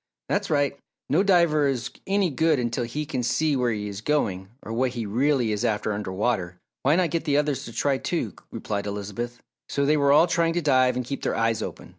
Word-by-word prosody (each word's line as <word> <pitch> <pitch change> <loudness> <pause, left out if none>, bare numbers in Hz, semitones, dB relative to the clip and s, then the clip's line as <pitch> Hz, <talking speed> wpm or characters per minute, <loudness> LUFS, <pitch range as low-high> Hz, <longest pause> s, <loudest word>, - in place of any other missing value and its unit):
"That's - - 0
right! 145 -2 +1 0.3
No 160 - +4
diver 170 -7 +4
is 125 -2 -2 0.2
any 195 -3 +2
good 160 +2 +2
until 120 0 -1
he 150 +6 -4
can 135 -4 -2
see 145 +5 +1
where 125 -2 +1
he 105 -1 -3
is 100 0 -6
going 100 -9 -1
or 110 - -6
what 125 +1 0
he 115 - -2
really 125 +2 +1
is 105 +2 -1
after 110 -2 0
under 100 -2 -4
water. 95 -3 -1 0.2
Why 145 +4 +3
not 175 -1 +1
get 165 -1 -1
the 145 -2 +2
others 145 -3 0
to 115 - -8
try, 135 +3 0
too," 170 - -2 0.2
replied 105 -2 -4
Elizabeth. 105 +4 -5 0.3
So 140 - 0
they 150 +2 +3
were 140 -1 +3
all 150 +4 +7
trying 170 -1 +1
to 175 - 0
dive 130 -3 +3
and 125 -1 -2
keep 140 +3 -5
their - - -1
eyes 115 -1 +1
open. - - -7
130 Hz, 225 wpm, -25 LUFS, 115-150 Hz, 0.3 s, all